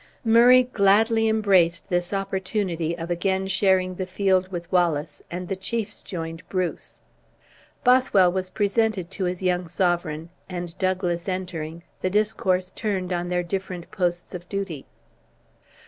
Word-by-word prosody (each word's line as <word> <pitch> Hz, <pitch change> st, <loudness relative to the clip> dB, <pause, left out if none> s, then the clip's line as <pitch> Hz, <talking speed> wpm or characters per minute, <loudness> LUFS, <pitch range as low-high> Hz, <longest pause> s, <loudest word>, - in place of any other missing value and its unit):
Murray 240 Hz, +3 st, +7 dB
gladly 225 Hz, 0 st, +3 dB
embraced 190 Hz, -6 st, +3 dB
this 175 Hz, -1 st, 0 dB
opportunity 190 Hz, -4 st, -2 dB
of 170 Hz, +1 st, -5 dB
again 190 Hz, +2 st, 0 dB
sharing 190 Hz, -1 st, +2 dB
the 185 Hz, 0 st, -4 dB
field 190 Hz, 0 st, +1 dB
with 170 Hz, -2 st, -6 dB
Wallace, 170 Hz, -5 st, +1 dB
and 180 Hz, +1 st, -5 dB
the 195 Hz, -, -2 dB
chiefs 210 Hz, +2 st, -4 dB
joined 165 Hz, -3 st, -6 dB
Bruce. 185 Hz, -3 st, -3 dB, 0.8 s
Bothwell 250 Hz, -8 st, +5 dB
was 185 Hz, 0 st, -2 dB
presented 205 Hz, -3 st, 0 dB
to 190 Hz, -1 st, -2 dB
his 180 Hz, +1 st, -3 dB
young 180 Hz, -1 st, +1 dB
sovereign, 170 Hz, -2 st, -1 dB, 0.2 s
and 175 Hz, -2 st, -5 dB
Douglas 185 Hz, -2 st, -1 dB
entering, 170 Hz, -3 st, -4 dB, 0.2 s
the 185 Hz, -, 0 dB
discourse 185 Hz, -3 st, +1 dB
turned 190 Hz, -4 st, -2 dB
on 175 Hz, 0 st, -2 dB
their 180 Hz, 0 st, 0 dB
different 180 Hz, 0 st, -5 dB
posts 175 Hz, -4 st, -2 dB
of 175 Hz, 0 st, -8 dB
duty. 195 Hz, -8 st, -4 dB
185 Hz, 135 wpm, -24 LUFS, 175-200 Hz, 0.8 s, Murray